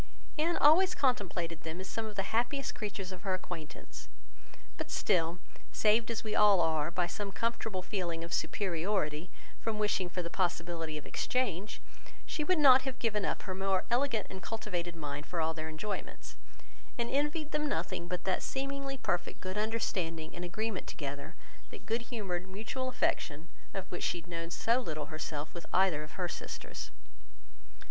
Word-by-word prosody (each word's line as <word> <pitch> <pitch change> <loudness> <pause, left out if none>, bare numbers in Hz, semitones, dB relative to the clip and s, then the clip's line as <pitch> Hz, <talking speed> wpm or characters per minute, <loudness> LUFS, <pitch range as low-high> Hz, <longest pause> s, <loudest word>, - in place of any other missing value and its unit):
Anne 335 +2 +3
always 360 +5 +7
contemplated 185 - +1
them 160 +2 -5
as 190 - -5
some 220 +3 -2
of 210 - -7
the 195 - +1
happiest 245 +5 +1
creatures 200 -3 -4
of 185 -1 -7
her 190 -2 +1
acquaintance; 175 -4 -7 0.7
but - - -4
still, 170 -3 +2 0.3
saved 220 +2 +4
as 230 - -1
we 215 -1 -2
all 205 -3 +7
are, 160 -2 +3
by 175 +1 +1
some 200 +3 -3
comfortable 225 -4 -1
feeling 175 -5 -1
of 170 - -5
superiority 175 -3 0 0.3
from 225 -1 -1
wishing 205 -4 +2
for 180 0 -2
the 170 - -3
possibility 170 -3 0
of 150 - -7
exchange, 210 -6 0 0.5
she 305 - -1
would 365 +4 +3
not 265 -3 +9
have 265 -1 -3
given 210 -4 +1
up - - -1
her 190 - -3
own 185 - -6
more 190 -1 +2
elegant 240 -4 +3
and 190 0 -7
cultivated 175 -6 -2
mind 145 -2 -4
for 175 - -2
all 160 0 +2
their 160 0 -4
enjoyments; 195 +6 -5 0.6
and 235 -1 +1
envied 295 +2 +1
them 300 0 +1
nothing 175 - -1
but 180 0 -2
that 190 -1 +1
seemingly 275 0 -2
perfect 175 -9 -1
good 185 0 -4
understanding 185 -7 -1
and 175 - -4
agreement 215 +3 -2
together, 145 +2 -5 0.3
that - - -10
good 230 +2 +1
humoured 190 -7 -2
mutual 225 +7 -2
affection, 160 - 0 0.2
of 195 -2 -3
which 175 - -3
she - - +2
had 165 - -20
known 165 -1 -3
so 230 +7 +3
little 155 - -4
herself 155 -1 -3
with 170 - -7
either 185 -5 +4
of 155 - -8
her 180 -2 -1
sisters. - - -6
190 Hz, 175 wpm, -33 LUFS, 170-230 Hz, 0.7 s, not